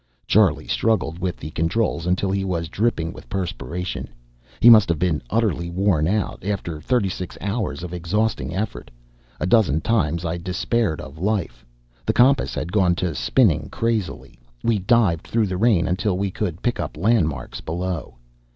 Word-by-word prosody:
Charlie - - +3
struggled 90 -7 0
with 90 -1 -2
the 75 - -8
controls 85 +1 0
until 95 +2 +1
he 100 0 0
was 85 -4 -2
dripping 90 -5 -1
with - - -13
perspiration. 90 -1 -4 0.5
He - - +5
must 110 -6 +8
have 85 - +1
been 85 -2 0
utterly 100 -7 0
worn 85 -3 +1
out, 105 +2 -1
after 90 -6 -3
thirty 125 -2 +1
six 90 -1 -6
hours 100 -7 -3
of 90 -1 -6
exhausting 105 +6 -1
effort. 105 +3 -4 0.5
A - - -1
dozen 90 - +3
times 85 -5 0
I 85 +1 -2
despaired 90 +1 -1
of 70 +3 -10
life. 100 -1 -2 0.4
The - - 0
compass 130 +3 +3
had 85 - -3
gone 95 -4 +3
to 85 -1 -2
spinning 80 - +2
crazily; 105 - -3 0.2
we 115 -3 +2
dived 95 -4 +2
through 115 -1 +1
the 95 -2 -3
rain 105 -4 +3
until 95 +1 0
we 100 0 -1
could 90 -4 -4
pick 120 - 0
up 80 -3 -4
landmarks 80 - 0
below. 90 +1 -4
90 Hz, 165 wpm, -22 LUFS, 85-110 Hz, 0.5 s, must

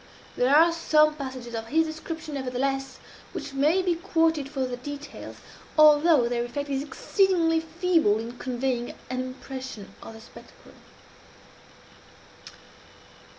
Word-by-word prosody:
There 250 - +2
are 330 +2 +6
some 305 -2 +3
passages 260 -5 -7
of 225 0 -4
his 320 +6 +2
description, 315 0 -6
nevertheless, 270 0 -2 0.4
which - - -6
may 305 +7 +2
be 360 -1 +2
quoted 325 -4 0
for 270 -3 -2
their 250 -1 -4
details, 290 +3 -8 0.4
although 305 -3 +6
their 240 0 -1
effect 285 +4 -5
is 270 -1 -1
exceedingly 330 +1 +1
feeble 325 - +1
in 235 +2 -7
conveying 250 -1 -2 0.2
an 255 - -2
impression 255 -4 -8
of - - -10
the 225 - -12
spectacle. - - -16
280 Hz, 125 wpm, -26 LUFS, 255-320 Hz, 0.4 s, are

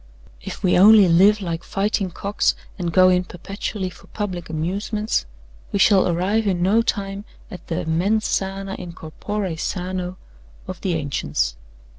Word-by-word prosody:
If - - -8
we 180 -1 +4
only 210 0 +8
live 195 +5 +5
like 170 -2 -3
fighting 200 -1 -1
cocks, 200 +4 0 0.2
and 175 -2 -1
go 185 +1 +6
in 180 0 +3
perpetually 190 +2 -5
for - - -17
public 185 -6 -5
amusements, 200 - -2 0.4
we - - 0
shall 195 -1 +5
arrive 190 +6 +1
in 180 -3 +1
no 210 +5 +4
time 200 -3 -3 0.3
at 180 - -10
the 165 - -2
mens 195 +7 +1
sana 195 0 -2
in 175 -2 -7
corpore 185 +3 -4
sano 180 0 -3 0.5
of 185 -2 -7
the 185 -4 0
ancients. 70 - -1
185 Hz, 150 wpm, -22 LUFS, 175-200 Hz, 0.5 s, only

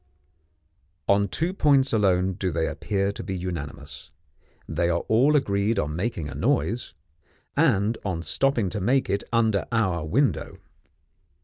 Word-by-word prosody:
On 100 0 +3
two 165 - -1
points 140 -7 +3
alone 95 -3 +2
do 95 0 -2
they 80 -1 -1
appear 100 -1 -1
to - - -7
be 95 -2 -4
unanimous 75 -5 -6 0.6
they 85 +2 0
are 85 0 +1
all 130 +7 +3
agreed 105 -4 +1
on 75 0 -1
making 95 -3 -2
a 70 - -7
noise, 120 - -1 0.6
and 115 -8 +2
on 85 -5 -3
stopping 130 -1 +1
to 105 +2 -4
make 130 +7 +1
it 100 - 0
under 110 -4 +1
our 95 -8 +1
window. 125 - 0
100 Hz, 140 wpm, -25 LUFS, 85-120 Hz, 0.6 s, On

